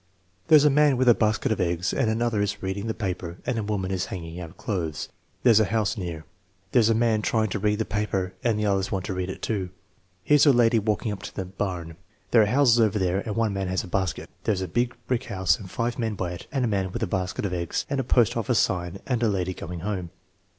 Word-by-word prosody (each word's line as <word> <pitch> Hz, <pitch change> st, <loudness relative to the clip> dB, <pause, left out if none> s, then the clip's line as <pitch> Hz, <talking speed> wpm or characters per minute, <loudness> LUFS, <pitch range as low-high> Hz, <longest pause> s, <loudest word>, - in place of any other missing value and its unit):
"There's 150 Hz, -2 st, +7 dB
a 150 Hz, -, +6 dB
man 145 Hz, -1 st, +4 dB
with 130 Hz, 0 st, +2 dB
a -, -, +9 dB
basket 110 Hz, 0 st, +1 dB
of 110 Hz, -, 0 dB
eggs 85 Hz, 0 st, 0 dB
and 120 Hz, -, +1 dB
another 115 Hz, -1 st, 0 dB
is 100 Hz, -1 st, -2 dB
reading 95 Hz, +3 st, -3 dB
the 110 Hz, -, -2 dB
paper 90 Hz, -4 st, -4 dB
and 120 Hz, -2 st, -1 dB
a -, -, -2 dB
woman 100 Hz, -3 st, -2 dB
is 95 Hz, -2 st, -1 dB
hanging 85 Hz, -2 st, -6 dB
out 85 Hz, -2 st, -9 dB
clothes. 85 Hz, -7 st, -3 dB, 0.3 s
There's 115 Hz, -4 st, +6 dB
a 110 Hz, -, +4 dB
house 110 Hz, 0 st, 0 dB
near." 85 Hz, -6 st, -5 dB, 0.5 s
"There's 115 Hz, -1 st, +4 dB
a 115 Hz, -, +3 dB
man 115 Hz, -2 st, +2 dB
trying 110 Hz, 0 st, +1 dB
to 100 Hz, -, -2 dB
read 105 Hz, +1 st, +1 dB
the 110 Hz, -, -1 dB
paper 95 Hz, -3 st, -2 dB
and 115 Hz, -3 st, +2 dB
the 105 Hz, -, 0 dB
others 95 Hz, -1 st, 0 dB
want 95 Hz, -2 st, -2 dB
to -, -, -3 dB
read 90 Hz, 0 st, -3 dB
it 95 Hz, -, -7 dB
too. 100 Hz, -5 st, -1 dB, 0.5 s
Here 150 Hz, +7 st, +4 dB
J -, -, +4 dB
s -, -, +7 dB
a -, -, +9 dB
lady 120 Hz, -1 st, +4 dB
walking 105 Hz, +1 st, -1 dB
up 100 Hz, -1 st, -6 dB
to 105 Hz, -, -8 dB
the 95 Hz, -, -3 dB
barn. 90 Hz, -4 st, -4 dB, 0.3 s
There 115 Hz, -, +6 dB
are 105 Hz, -, +3 dB
houses 120 Hz, 0 st, +4 dB
over 110 Hz, -2 st, +3 dB
there 95 Hz, -1 st, +1 dB
and 105 Hz, 0 st, -4 dB
one 115 Hz, -3 st, +1 dB
man 95 Hz, -1 st, -2 dB
has 95 Hz, +1 st, -1 dB
a -, -, -8 dB
basket." 95 Hz, 0 st, -2 dB, 0.2 s
"There's 100 Hz, -4 st, 0 dB
a 95 Hz, -, -2 dB
big 120 Hz, +8 st, 0 dB
brick 125 Hz, 0 st, -1 dB
house 95 Hz, -4 st, +1 dB
and 95 Hz, -, -9 dB
five 120 Hz, +3 st, -2 dB
men 110 Hz, -2 st, -1 dB
by 90 Hz, -3 st, -3 dB
it 90 Hz, -, -8 dB
and 135 Hz, -3 st, 0 dB
a -, -, +1 dB
man 95 Hz, -3 st, -1 dB
with 120 Hz, +4 st, -3 dB
a -, -, +3 dB
basket 95 Hz, -1 st, -2 dB
of 95 Hz, -, -2 dB
eggs 85 Hz, -1 st, -2 dB
and 140 Hz, -1 st, -1 dB
a -, -, 0 dB
post 120 Hz, -2 st, +3 dB
office 115 Hz, +1 st, 0 dB
sign 90 Hz, 0 st, 0 dB
and 125 Hz, -3 st, -1 dB
a 115 Hz, -, +3 dB
lady 95 Hz, -2 st, -1 dB
going 85 Hz, -1 st, -7 dB
home." 95 Hz, -3 st, -3 dB
105 Hz, 260 wpm, -25 LUFS, 95-115 Hz, 0.5 s, a